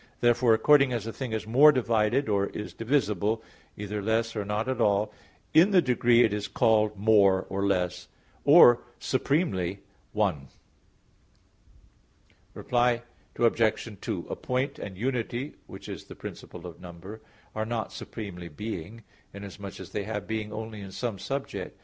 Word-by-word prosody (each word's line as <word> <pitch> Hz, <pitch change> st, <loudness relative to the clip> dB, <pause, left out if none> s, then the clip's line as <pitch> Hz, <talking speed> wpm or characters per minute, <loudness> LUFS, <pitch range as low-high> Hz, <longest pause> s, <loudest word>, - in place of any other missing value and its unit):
Therefore 120 Hz, -1 st, +4 dB
according 140 Hz, +3 st, +5 dB
as 115 Hz, -3 st, -3 dB
a 115 Hz, -, -5 dB
thing 130 Hz, -4 st, -5 dB
is 110 Hz, -1 st, -3 dB
more 135 Hz, +7 st, +7 dB
divided, 115 Hz, 0 st, +1 dB
or 100 Hz, -2 st, +1 dB
is 105 Hz, -, -7 dB
divisible, 110 Hz, -4 st, 0 dB, 0.3 s
either 105 Hz, 0 st, -4 dB
less 115 Hz, +2 st, 0 dB
or 105 Hz, -, -2 dB
not 105 Hz, +3 st, -2 dB
at 130 Hz, -, -1 dB
all, 105 Hz, +1 st, +2 dB, 0.4 s
in 165 Hz, +5 st, +6 dB
the 195 Hz, -3 st, +5 dB
degree 120 Hz, -4 st, +4 dB
it 110 Hz, -, +2 dB
is 105 Hz, 0 st, -3 dB
called 110 Hz, -1 st, +2 dB
more, 100 Hz, -2 st, +4 dB
or 100 Hz, +1 st, -1 dB
less, 90 Hz, -2 st, -1 dB, 0.4 s
or 140 Hz, -6 st, +8 dB, 0.2 s
supremely, 100 Hz, -, -1 dB, 0.3 s
one. 95 Hz, -10 st, -1 dB, 2.1 s
Reply 120 Hz, -1 st, +1 dB, 0.3 s
Obj. 115 Hz, -2 st, +1 dB
2: -, -, -4 dB
A -, -, -4 dB
point 130 Hz, +2 st, -2 dB
and 95 Hz, -2 st, -7 dB
unity 125 Hz, +3 st, -2 dB
which -, -, -10 dB
is -, -, -7 dB
the -, -, -11 dB
principle 90 Hz, 0 st, -9 dB
of 85 Hz, -2 st, -10 dB
number, 90 Hz, +5 st, -10 dB, 0.3 s
are 110 Hz, -, -2 dB
not 110 Hz, 0 st, -3 dB
supremely 95 Hz, -6 st, -7 dB
being, 105 Hz, +5 st, -7 dB, 0.3 s
inasmuch 100 Hz, -1 st, -8 dB
as -, -, -10 dB
they 100 Hz, -, -3 dB
have 105 Hz, -1 st, -4 dB
being 110 Hz, -1 st, -4 dB
only 110 Hz, 0 st, -6 dB
in 95 Hz, -1 st, -9 dB
some 110 Hz, -1 st, -4 dB
subject. 135 Hz, +8 st, -5 dB
110 Hz, 150 wpm, -27 LUFS, 100-120 Hz, 2.1 s, or